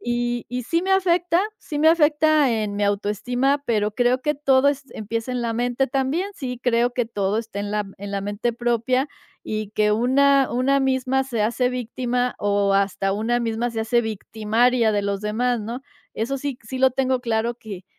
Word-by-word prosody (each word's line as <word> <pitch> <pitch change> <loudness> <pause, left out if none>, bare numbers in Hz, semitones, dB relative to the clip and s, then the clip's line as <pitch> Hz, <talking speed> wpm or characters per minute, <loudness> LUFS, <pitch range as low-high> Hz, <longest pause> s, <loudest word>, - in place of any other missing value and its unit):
y 240 0 -2
y 250 0 -3
sí 335 +7 0
me 380 - -2
afecta. 355 -2 +2 0.2
Sí 295 - -5
me 310 +2 +5
afecta 310 -3 +4
en 215 -3 -1
mi 205 - +1
autoestima, 245 +7 0
pero 210 -4 0
creo 245 +1 +2
que 300 +3 0
todo 275 -1 +3
est 280 -1 -2
empieza 225 +3 -4
en 250 - -2
la 230 -1 -2
mente 245 +3 0
también. 275 +9 -1
Sí, 250 -6 -5
creo 240 0 +2
que 245 -1 -1
todo 205 -2 -1
esté 220 -3 -5
en 205 0 -4
la 210 0 0
m 195 -1 -8
en 200 0 -7
la 200 0 -2
mente 205 +4 -2
propia 240 +3 0 0.3
y 215 -1 -4
que 210 0 +2
una 270 +4 +3
una 260 +3 +2
misma 265 0 +1
se 245 -4 -3
hace 240 +3 +1
víctima 250 0 -2
o 200 -1 +1
hasta 195 0 +1
una 230 +4 0
misma 230 +1 -1
se 225 -1 -3
hace 235 +2 +1
victimaria 220 +2 +1
de 205 - +1
los 200 0 -2
demás, 240 +4 0
¿no? 230 +4 -5 0.3
Eso 240 +5 -2
sí 275 -2 -4
c 230 - -20
sí, 260 - -4
lo 260 0 +5
tengo 260 0 0
claro 230 -1 -1
que 205 -6 -9
240 Hz, 200 wpm, -23 LUFS, 215-265 Hz, 0.3 s, me